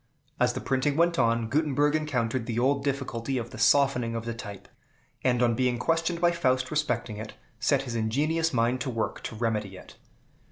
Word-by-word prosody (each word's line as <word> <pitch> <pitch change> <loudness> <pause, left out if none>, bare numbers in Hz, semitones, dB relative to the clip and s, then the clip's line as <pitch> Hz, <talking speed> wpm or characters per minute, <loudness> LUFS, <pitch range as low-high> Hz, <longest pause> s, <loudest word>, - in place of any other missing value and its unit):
As 125 0 +3
the 130 - -4
printing 135 +2 0
went 170 -1 +3
on, 115 -1 +2
Gutenberg 145 +2 +1
encountered 130 -6 -1
the 115 -2 -2
old 135 +3 +2
difficulty 135 -2 -2
of 120 0 -4
the - - -9
softening 130 -5 +3
of 115 0 -4
the 115 - -3
type, 105 -4 -9 0.6
and, 125 -1 +2
on 120 -1 +3
being 125 +1 +1
questioned 165 +4 0
by 175 0 +4
Faust 130 -6 0
respecting 125 -8 -1
it, 110 +1 -7 0.2
set 135 +2 +2
his 125 -3 -5
ingenious 150 +9 0
mind 120 +1 +1
to 130 - -2
work 115 -3 -3
to - - -6
remedy 105 -4 -2
it. - - -14
125 Hz, 190 wpm, -27 LUFS, 115-145 Hz, 0.6 s, by